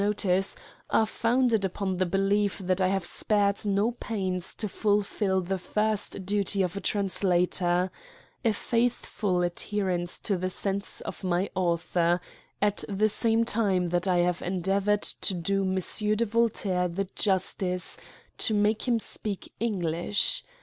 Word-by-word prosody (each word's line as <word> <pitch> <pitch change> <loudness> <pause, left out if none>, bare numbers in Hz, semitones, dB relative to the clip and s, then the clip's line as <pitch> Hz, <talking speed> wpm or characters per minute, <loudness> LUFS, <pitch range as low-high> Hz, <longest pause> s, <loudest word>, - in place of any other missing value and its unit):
notice, 195 -2 +1 0.3
are 220 - +4
founded 230 0 +1
upon 190 0 -2
the 185 - +2
belief 195 +2 +1
that 185 -1 -1
I 185 - +4
have 190 -1 0
spared 200 0 +1
no 205 +2 +2
pains 190 -7 -3
to 215 - -3
fulfil 200 -1 +1
the 190 +1 -2
first 210 0 -1
duty 200 0 +1
of 180 +1 -2
a 200 - -4
translator— 180 -2 +1 0.5
a 230 - +4
faitliful 215 -5 0
adherence 175 -1 -2
to 200 - 0
the 185 +1 -2
sense 195 +1 -2
of - - -7
my 180 +1 0
author, 175 -1 +1 0.4
at 205 0 +1
the 210 +2 +2
same 225 +2 +2
time 195 -6 +1
that 175 +2 0
I 180 -1 +3
have 180 0 -1
endeavour. 195 +3 +1
€d - - +2
to 195 - +1
do 195 +3 0
M. 190 +3 0
de 235 - +2
Voltaire 205 -5 +1
the 190 +3 -3
justice 185 -2 0 0.4
to 220 - +1
make 210 +3 +1
him 245 - +3
PKEFACE. - - +3
i 225 - -4
speak 205 -3 -5
English. 200 - 0
195 Hz, 150 wpm, -27 LUFS, 180-210 Hz, 0.5 s, are